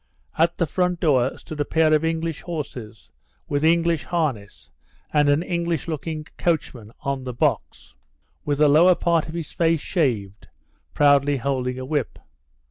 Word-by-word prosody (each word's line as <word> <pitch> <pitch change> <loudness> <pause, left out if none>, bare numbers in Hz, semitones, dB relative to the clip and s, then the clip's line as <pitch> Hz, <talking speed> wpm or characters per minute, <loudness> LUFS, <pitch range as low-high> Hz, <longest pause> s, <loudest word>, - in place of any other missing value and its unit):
At 170 +1 +2
the 170 - +1
front 180 +2 -1
door 135 -5 +2
stood 155 - -9
a - - +2
pair 160 +1 +2
of 155 0 +3
English 165 -1 -2
horses, 125 - -7 0.4
with 145 +1 -1
English 170 0 +2
harness, 125 - -3 0.4
and 145 -1 +3
an 145 +3 +2
English 170 -4 -2
looking 155 -1 -4
coachman 130 -10 -2
on 140 -2 -3
the 125 -2 -6
box, 70 - -2 0.5
with 145 - -1
the 150 +1 +5
lower 170 +5 +6
part 170 -2 +1
of 160 - -7
his 165 -3 -5
face 165 -1 +1
shaved, 110 - -2 0.5
proudly 145 0 +4
holding 130 -1 -2
a 130 - -5
whip. 145 -2 -2
150 Hz, 155 wpm, -23 LUFS, 130-165 Hz, 0.5 s, lower